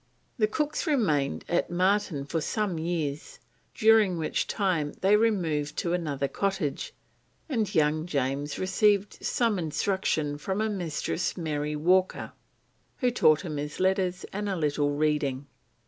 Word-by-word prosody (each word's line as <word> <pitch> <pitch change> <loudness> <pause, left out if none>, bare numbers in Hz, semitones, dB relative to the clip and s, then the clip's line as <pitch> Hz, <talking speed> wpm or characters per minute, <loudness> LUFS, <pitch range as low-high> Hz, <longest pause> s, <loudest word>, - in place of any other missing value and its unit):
The 215 - +4
Cooks 300 +8 -2
remained 155 - +1
at 175 - 0
Marton 180 -5 +1
for 160 +3 -2
some 200 -2 -1
years, 160 -3 -3 0.4
during 215 -5 +4
which 160 -1 -1
time 175 -8 0
they 195 +2 +5
removed 175 -10 +1
to 170 - -1
another 145 -6 -1
cottage, 190 -4 -2 0.5
and 225 - -1
young 155 +1 +2
James 140 -1 -1
received 200 +1 +1
some 230 -5 +1
instruction 155 -2 -1
from 190 +6 -2
a 220 0 0
Mistress 175 -2 -2
Mary 150 -3 -2
Walker, 185 +5 +1 0.7
who 250 -2 +1
taught 155 -10 +4
him 155 -4 -5
his 150 +1 -5
letters 185 -1 +1
and 205 +1 -2
a 195 - -1
little 145 -3 0
reading. 145 -2 0
175 Hz, 135 wpm, -27 LUFS, 150-200 Hz, 0.7 s, they